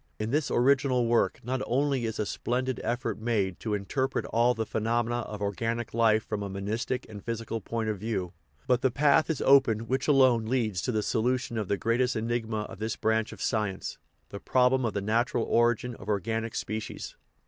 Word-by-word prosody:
In 110 +1 -3
this 150 -1 +1
original 130 -1 +3
work 115 0 +2
not 130 +2 -2
only 135 -1 +1
is 110 -1 -3
a 105 - -1
splendid 130 +4 -2
effort 120 +2 -2
made 105 -5 -1
to 110 -2 -1
interpret 130 +7 -1
all 120 +2 +2
the 110 - -2
phenomena 115 +2 0
of 105 -3 -5
organic 115 +4 -2
life 110 -1 +3
from 105 - -3
a 100 - -4
monistic 105 +6 -3
and 105 -2 -10
physical 115 -1 -4
point 115 +2 -3
of 105 -3 -2
view, 95 -4 -3 0.3
but 125 -1 +2
the 130 - +3
path 145 +5 +3
is 160 - -1
opened 130 -5 +5
which 130 +3 -1
alone 130 -6 +4
leads 110 -7 0
to 125 - -1
the 110 -2 0
solution 125 +2 0
of 110 -3 -2
the 100 - 0
greatest 125 +4 +1
enigma 110 -1 -1
of 105 - -8
this 110 +1 -2
branch 110 0 0
of - - -10
sci 105 -4 +1
ence 95 - -7 0.3
the 100 - -7
problem 130 +2 +2
of 110 - -1
the 100 - -1
natural 115 +4 +1
origin 120 +1 +2
of 105 -2 -10
organic 110 +3 -1
spe 110 +1 -2
cies. - - -7
115 Hz, 200 wpm, -28 LUFS, 110-125 Hz, 0.3 s, opened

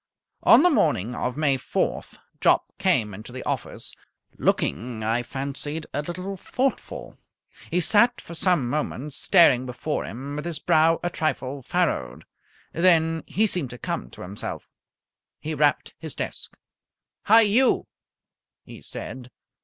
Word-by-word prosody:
On 250 +6 +7
the 360 - +5
morning 125 - +1
of 125 +2 -3
May 140 -4 +2
4th - - -2 0.2
Jopp - - +4 0.2
came 105 -2 +2
into 110 +5 -10
the 130 - -7
office, - - -4 0.5
looking, 115 -1 0
I 115 +3 +1
fancied, 140 +4 -5
a 145 - 0
little 185 +5 -5
thoughtful. 260 +7 -3 0.5
He 180 - +1
sat 235 +7 +4
for 170 - -10
some 170 -6 +1
moments 150 +1 -3
staring 130 -9 +5
before 125 +5 -3
him 135 +6 -6
with 150 - -5
his 170 -3 -2
brow 165 -1 +3
a 175 - -1
trifle 140 -4 -2
furrowed; 65 - -1 0.5
then 165 -2 +3
he 215 - +2
seemed 180 - 0
to 125 - -9
come - - -4
to - - -10
himself. 95 +3 -6 0.7
He 155 - -4
rapped 145 -1 +1
his - - -7
desk. - - -6 0.7
"Hi! 225 +2 +7
You!" 225 +5 +3 0.8
he - - -12
said. 125 -1 -8
150 Hz, 140 wpm, -25 LUFS, 125-175 Hz, 0.8 s, On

